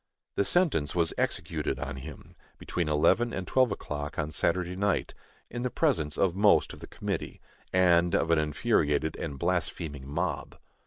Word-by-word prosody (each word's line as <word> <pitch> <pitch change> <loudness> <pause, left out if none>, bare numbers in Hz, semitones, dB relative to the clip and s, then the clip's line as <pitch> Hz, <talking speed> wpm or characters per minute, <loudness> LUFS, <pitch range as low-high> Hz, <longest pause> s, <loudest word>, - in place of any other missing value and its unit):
The 100 - +1
sentence 145 - +2
was 85 -2 +2
executed - - -2
on - - -5
him, 75 +1 -10 0.2
between 85 -3 -2
eleven 110 +11 +3
and 95 -4 -4
twelve 130 +1 +3
o'clock 75 -5 -5
on 75 -1 -2
Saturday 90 +3 0
night, 100 +1 0 0.3
in 120 - -5
the 125 - -1
presence 110 - 0
of 95 -3 +2
most 105 +1 +4
of - - -11
the - - -9
committee, - - -4 0.3
and 85 -2 +4
of 80 - +1
an 85 - +4
infuriated 75 -1 +1
and 70 - -5
blaspheming 80 -4 -2
mob. 85 +4 -3
85 Hz, 160 wpm, -28 LUFS, 75-100 Hz, 0.3 s, most